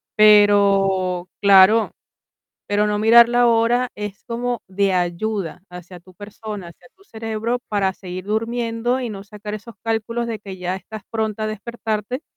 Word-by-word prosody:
pero 200 -3 +4
claro, 200 +2 +6 0.8
pero 205 +1 +1
no 210 0 -1
mirar 230 +2 +7
la 240 0 +3
hora 235 +2 +2
es 210 -1 -7
como 240 0 -3
de 195 0 +1
ayuda 180 0 -2
hacia 180 0 -11
tu 185 +1 -19
persona, 205 -1 -8
hacia 210 +9 -19
tu 390 - -24
cerebro 225 - -3
para 195 -3 0
seguir 185 0 -8
durmiendo 230 +3 -1
y 240 - -3
no 195 -2 -8
sacar 210 0 -7
esos 215 +1 -11
cálculos 230 +1 -2
de 220 -3 -4
que 195 -2 -9
ya 180 +1 -3
estás 215 +3 -10
pronta 220 -1 -2
a - - -1
despertarte, 220 +3 -4
210 Hz, 155 wpm, -20 LUFS, 195-230 Hz, 0.8 s, mirar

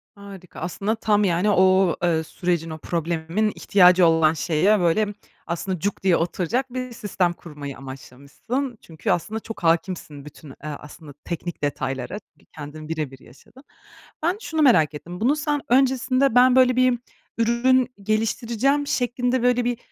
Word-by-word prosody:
Harika 200 -3 -12
aslında, 195 +6 -2
tam, 210 -2 +1
yani, 185 +2 +1
o, 185 -2 +4
eee, 165 -2 +2
sürecin, 170 0 -2
o 155 - -6
problemin 170 +5 -1
ihtiyacı 180 -2 +5
olan 160 -1 +4
şeye 175 +6 +2
böyle 205 +5 +1 0.3
aslında 175 +2 -3
cuk 200 +3 -3
diye 185 -3 +4
oturacak 195 +10 -2
bir 255 -1 -4
sistem 195 -5 -1
kurmayı 145 -5 -9
amaçlamışsın. 140 - -6
Çünkü, 160 -1 -4
aslında, 215 +6 -1
çok 225 -4 -9
hâkimsin 165 -3 -1
bütün, 150 0 -13
eee, - - -11
aslında 150 0 -9
teknik 175 -1 -5
detaylara. 135 +4 -3
Çünkü - - -31
kendin 155 +1 -9
bire 155 -4 -3
bir 135 - -13
yaşadın. 220 - -18 0.6
Ben 350 +5 +1
şunu 320 -7 -2
merak 160 - +4
ettim. 175 +4 -8
Bunu 265 +6 +3
sen 295 -2 -1
öncesinde, 260 0 +2
ben 250 +1 +6
böyle 255 -1 +5
bir 255 -1 +3 0.4
ürün 240 +2 +3 0.2
geliştireceğim 235 +6 0
şeklinde 245 0 0
böyle 245 -1 +2
bir, 245 -1 -1
190 Hz, 150 wpm, -23 LUFS, 160-245 Hz, 0.6 s, ben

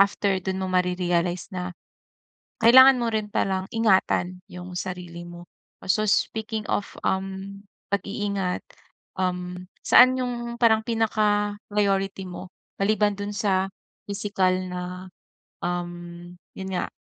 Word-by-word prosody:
after 200 -1 +2
do'n 190 0 -2
mo 190 - -1
mare-realize 180 -1 0
na 180 0 -3 0.9
kailangan 260 +3 +9
mo 235 - 0
rin 215 -1 -1
palang 190 -1 -1
ingatan 190 -4 +2
‘yong 180 0 -8
sarili 180 -2 -5
mo. 175 0 -10 0.4
So, 195 +3 +1
speaking 220 +1 0
of, 205 - -2
um, 195 +1 -2 0.3
pag-iingat, 200 -1 -1 1.2
saan 255 +1 +8
‘yung 240 -1 -3
parang 220 -2 +4
pinaka-priority 205 -3 0
mo 180 0 -8 0.3
maliban 205 0 +2
do'n 205 0 -4
sa 195 -3 +1 0.4
pisikal 200 -2 0
na, 180 0 -4 0.8
um 175 0 -5 0.2
'yon 190 0 -5
nga, 180 - -1
195 Hz, 110 wpm, -25 LUFS, 180-210 Hz, 1.2 s, kailangan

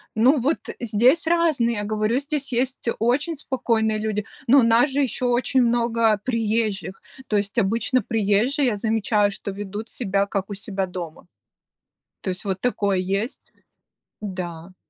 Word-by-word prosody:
Ну 255 +7 +4
вот 285 +7 +1 0.2
здесь 240 +8 +3
разные, 315 -9 +2
я 205 - -2
говорю, 215 +3 0
здесь 285 -1 -4
есть 250 0 -1
очень 275 +9 +1
спокойные 230 -6 0
люди, 215 -1 -2 0.2
но 275 +4 +7
у - - +4
нас 230 +5 +4
же 275 +2 -1
еще 255 -1 -1
очень 250 +2 +2
много 230 -2 +2
приезжих. 220 -5 -1 0.3
То 210 - +1
есть 200 +3 -2
обычно 230 +4 +2
приезжие, 225 +6 +1
я 230 - +1
замечаю, 210 -1 +1
что 200 - -5
ведут 205 +3 -6
себя, 200 -4 0
как 200 0 -3
у - - -4
себя 195 -1 -3
дома. 175 -3 -8 0.9
То 190 - -3
есть 180 +3 -5
вот 190 -2 -2
такое 200 -5 0
есть 195 +6 -3 0.7
Да. 185 -3 -6
225 Hz, 155 wpm, -23 LUFS, 200-250 Hz, 0.9 s, но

